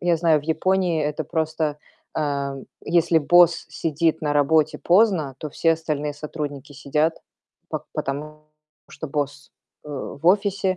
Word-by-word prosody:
Я 175 -1 +2
знаю, 160 -2 +4
в - - -16
Японии 175 0 +1
это 150 +1 -2
просто, 155 -1 -1 0.4
э, 140 -2 -1 0.3
если 170 0 +2
босс 175 +2 +5
сидит 160 0 0
на 150 -1 -1
работе 155 +1 +3
поздно, 175 - +3
то 155 - -5
все 165 +3 +2
остальные 150 -2 -2
сотрудники 145 -1 -6
сидят, 150 +4 0 0.6
по - - -4
потому 150 +2 -4 0.5
что 160 - -7
босс, 145 0 -3 0.3
э, - - -11
в 145 +2 -6
офисе, 195 0 +2
155 Hz, 140 wpm, -23 LUFS, 145-170 Hz, 0.6 s, босс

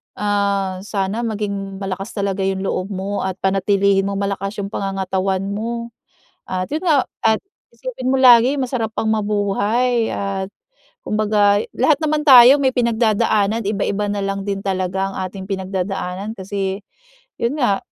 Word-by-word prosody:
Ah, 200 -2 0
sana 205 +3 -2
maging 200 -3 -4
malakas 195 +2 -4
talaga 195 -2 -1
'yung 190 0 -1
loob 185 -1 -2
mo 195 +2 -3
at 190 -1 -2
panatilihin 195 0 +2
mong 200 0 -2
malakas 195 +1 -3
'yung 200 0 -5
pangangatawan 190 -1 -1
mo. 235 +3 -4 0.6
At 185 0 -2
yun 310 - -2
nga, 310 -7 +3 0.2
at 220 -1 +3 0.4
isipin 465 - -4
mo 265 - +3
lagi 250 0 +7
masarap 245 -4 -2
pang - - -1
mabuhay 215 +3 +1
at, 195 -1 -3 0.6
kumbaga 210 -1 +2
lahat 310 - +3
naman 305 0 0
tayo 260 +1 +9
may 265 -2 +1
pinagdadaanan 225 -2 +1
iba-iba 205 0 -1
na 205 - -2
lang 195 0 -2
din 200 0 -2
talaga 190 0 -1
ang 195 - -7
ating 190 +1 -7
pinagdadaanan 190 +1 -3
kasi, 195 0 -3 0.6
yun 235 +5 0
nga, 225 -8 +2
200 Hz, 145 wpm, -20 LUFS, 195-225 Hz, 0.6 s, tayo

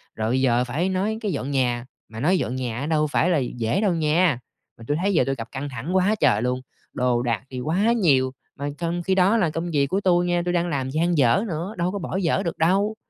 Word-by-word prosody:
Rồi 110 0 -1
bây 130 +2 +1
giờ 125 -1 +3
phải 150 +10 -1
nói 200 +4 -1
cái 210 - -1
dọn 140 -2 -3
nhà, 125 -3 0 0.2
mà 110 0 -8
nói 180 +8 +3
dọn 130 - -2
nhà 120 -3 -3
á 140 - -3
đâu 155 -1 +1
phải 160 +4 +1
là 170 - +3
dễ 120 - -1
đâu 200 -4 +2
nha, 160 -3 +2 0.4
mà 115 - -12
tui 145 - 0
thấy 200 +1 +1
giờ 160 - +4
tui 135 +1 -1
gặp 115 -2 -7
căng 140 +1 -5
thẳng 130 +9 -4
quá 190 +3 +3
trời 120 -8 +3
luôn! 125 +1 -1 0.3
Đồ 125 -1 +1
đạc 115 -3 -1
thì 130 - -6
quá 180 - +1
nhiều 140 - +3 0.2
mà 145 +1 -4
trong 175 0 -2
khi 190 +2 +1
đó 195 +4 +4
là 180 -7 +2
công 165 +3 -4
việc 140 -3 +2
của 195 +8 -1
tui 175 -2 +3
nha 175 0 +1
tui 175 - 0
đang 175 0 +1
làm 135 -4 -2
dang 165 +4 0
dở 125 - +4
nữa, 170 +4 -4
đâu 175 +1 0
có 200 - -4
bỏ 185 +1 -4
dở 180 -4 +1
được 170 - -3
đâu? 195 +6 +2
155 Hz, 260 wpm, -23 LUFS, 130-180 Hz, 0.4 s, giờ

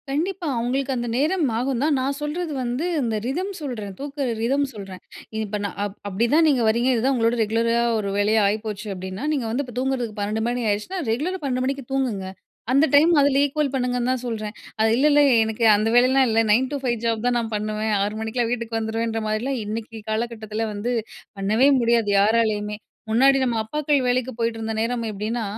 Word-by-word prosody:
கண்டிப்பா. 340 +5 -2
அவங்களுக்கு 260 +3 -1
அந்த 240 -1 -3
நேரம் 315 +4 +1
ஆகும் 250 0 -1
தான். 300 -1 +2
நான் 270 +2 -1
சொல்றது 310 +3 -3
வந்து 245 +6 -2 0.2
இந்த 230 -3 -1
ரிதம் 355 +10 -2
சொல்றேன், 220 -9 -5
தூங்குற 280 -1 -3
ரிதம் 275 +5 +1
சொல்றேன், 195 -3 -9 0.4
இப்போ 210 -1 -3
நான் 200 - -5
அப் 205 -1 -4
அப்படிதான் 235 - +2
நீங்க 265 -4 +2
வர்றீங்க 235 +3 +2
இதுதான் 250 +3 +1
உங்களோட 230 0 +2
ரெகுலரா 230 +2 +1 0.2
ஒரு 200 -2 -2
வேலையா 215 +2 +3
ஆயிப்போச்சு 210 0 -3
அப்படின்னா, 190 +6 -6
நீங்க 270 -6 -1
வந்து 260 +5 -1
இப்போ 245 -2 -11
தூங்குறதுக்கு 255 -5 -2
12 210 +2 -1
மணி 245 0 -2
ஆயிடுச்சுனா, 215 - -2
ரெகுலரா 335 +11 -2
12 255 -2 -1
மணிக்கு 275 -1 -3
தூங்குங்க. 235 -8 -1 0.4
அந்த 275 +4 +5
டைம் 315 +4 +6
அதில 280 -1 +3
ஈக்குவல் 285 -1 -1
பண்ணுங்கன்னு 250 -1 0
தான் 255 -1 -2
சொல்றேன். 215 -2 -4 0.3
அது 220 0 +3
இல்ல, 280 +4 +4
இல்ல 290 0 +5 0.2
எனக்கு 220 +1 -3
அந்த 215 +2 0
வேலையெல்லாம் 260 +2 +5
இல்ல. 225 0 +2
9 255 +4 +3
டு 290 - -1
5 245 -2 +1
ஜாப் 230 0 0
தான் 245 -1 +2
நான் 225 -1 -4
பண்ணுவேன், 215 +1 -2
6 205 +1 -2
மணிக்கெல்லாம் 225 +1 -1
வீட்டுக்கு 235 -2 -2
வந்துருவேன்ற 225 0 -2
மாதிரிலாம் 240 +5 -1
இன்னைக்கு 225 +2 -5
காலகட்டத்தில 220 -1 -3
வந்து 215 +4 -2 0.5
பண்ணவே 215 +8 +3
முடியாது, 230 -3 +2
யாராலேயுமே. 210 -1 +1 0.3
முன்னாடி 270 +5 +5
நம்ம 245 -2 0
அப்பாக்கள் 295 +5 0
வேலைக்கு 250 +1 0
போய்ட்டிருந்த 225 -1 -2
நேரம் 235 +1 -1
எப்படின்னா, 215 +3 -3
235 Hz, 185 wpm, -23 LUFS, 220-270 Hz, 0.5 s, டைம்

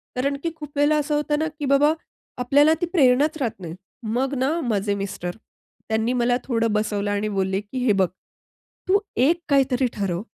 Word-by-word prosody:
कारण 280 +3 0
की 335 - -1
खूप 300 -2 -9
वेळेला 295 +1 +4
असं 295 +1 -1
होतं 295 0 0
ना, 315 - 0
की 295 - -2
बाबा 295 +3 +4 0.5
आपल्याला 290 +5 +5
ती - - +2
प्रेरणाच 290 +1 +4
राहत 240 -8 -3
नाही. 165 -2 -6 0.4
मग 265 +2 0
ना 315 +5 +1
माझे 200 0 0
मिस्टर 175 -2 -5 0.5
त्यांनी 220 +2 +1
मला 245 +1 +2
थोडं 230 -3 0
बसवलं 210 -1 -1
आणि 205 +1 -1
बोलले 190 +1 0
की 250 +5 -4
"हे 230 - +4
बघ, 185 - +3 0.8
तू 400 +2 +4 0.3
एक 340 +2 +2
काहीतरी 265 -2 +3
ठरव, 190 -3 -2
255 Hz, 180 wpm, -23 LUFS, 210-295 Hz, 0.8 s, आपल्याला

